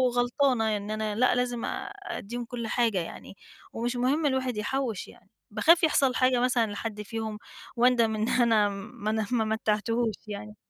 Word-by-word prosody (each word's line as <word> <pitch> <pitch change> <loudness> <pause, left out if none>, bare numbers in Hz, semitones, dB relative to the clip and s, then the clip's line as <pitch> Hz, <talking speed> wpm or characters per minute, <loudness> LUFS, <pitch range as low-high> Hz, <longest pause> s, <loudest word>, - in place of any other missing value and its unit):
غلطانة، 245 -3 +2
إن 205 +1 -6
أنا 215 -1 -2
لأ، 250 +2 +3
لازم 245 -1 -1
آآ، - - -5
اديهم 240 - -5
كل 235 -1 -5
حاجة 225 -3 +1
يعني 175 +3 -8 0.4
ومش 240 +2 -2
مهم 265 +6 +1
الواحد 260 -4 0
يحوِّش، 230 0 -2
يعني - - -18 0.2
باخاف 335 +1 +4
يحصل 275 -5 +3
حاجة 255 -1 +3
مثلًا 240 -3 +2
لحد 210 0 -5
فيهم، 220 0 -5 0.4
واندم 235 -2 +3
إن 215 +1 -1
أنا 225 -4 +3
ما 200 +1 -5
ن 220 -1 0
ما 230 -3 +2
متّعتهوش 220 +1 0
يعني. 210 +1 -7
230 Hz, 165 wpm, -27 LUFS, 215-250 Hz, 0.4 s, باخاف